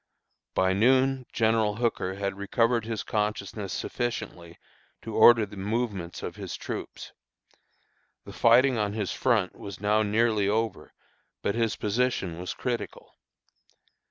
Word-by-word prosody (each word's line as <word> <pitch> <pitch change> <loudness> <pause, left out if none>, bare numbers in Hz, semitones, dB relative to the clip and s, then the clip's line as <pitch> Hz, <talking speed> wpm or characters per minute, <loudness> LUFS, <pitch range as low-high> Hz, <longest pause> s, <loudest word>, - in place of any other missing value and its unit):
By 95 0 +3
noon 130 +4 +3
General 110 -2 +2
Hooker 110 -5 -1
had 100 -1 -3
recovered 115 +3 +1
his 115 -2 -3
consciousness 105 -2 -3
sufficiently 90 -8 -4 0.5
to 115 - -6
order 115 0 +7
the 105 0 -12
movements 100 -3 -3
of - - -6
his - - -6
troops. - - -7 1.1
The - - -10
fighting 120 +1 +4
on 105 -1 -1
his 105 -5 -2
front 110 -8 +1
was 100 -2 -9
now 105 +2 +2
nearly 110 -1 +2
over, 110 0 -2 0.5
but 100 - +1
his 115 -2 0
position 105 -6 -1
was 90 - -5
critical. 120 -2 -5
110 Hz, 130 wpm, -27 LUFS, 100-115 Hz, 1.1 s, order